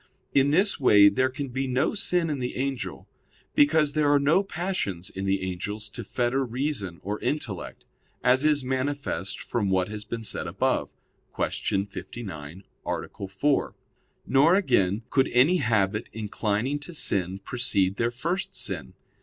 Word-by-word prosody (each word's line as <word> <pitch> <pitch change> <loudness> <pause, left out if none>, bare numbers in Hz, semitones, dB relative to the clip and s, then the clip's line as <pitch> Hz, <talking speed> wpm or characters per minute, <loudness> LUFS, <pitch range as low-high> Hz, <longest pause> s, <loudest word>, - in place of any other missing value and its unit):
In 140 0 +4
this 190 +6 +3
way 105 -6 +7
there 130 +6 +1
can 135 +1 -5
be 130 +2 -2
no 130 +5 +1
sin 180 -5 0
in 145 - -2
the 125 0 -3
angel; 135 -2 -3 0.5
because 145 0 +4
there 150 -2 +3
are 145 - +6
no 150 +7 +4
passions 175 - -3
in 95 +1 -4
the 95 0 +1
angels 100 +3 -4
to 120 - -7
fetter 120 +5 0
reason 120 - -3
or 105 +2 -3
intellect, 115 - -4 0.4
as 125 +2 +4
is 150 -2 +3
manifest 130 -6 -2
from 110 -5 -1
what 95 0 +1
has 105 0 -5
been 115 +2 -5
said - - -2
above - - 0 0.5
(Q. 100 0 -1
59, 95 -5 -8 0.2
A. 100 - -4
4); 135 +10 0 0.5
nor, 145 +7 +5
again, 100 - +2
could 135 -1 +3
any 140 +9 +5
habit 110 - +1
inclining 110 +5 -1
to 165 +4 -8
sin 95 - 0
precede 100 -3 0
their 115 - +1
first 180 +10 -3
sin. 80 -10 -4
125 Hz, 155 wpm, -26 LUFS, 100-145 Hz, 0.5 s, way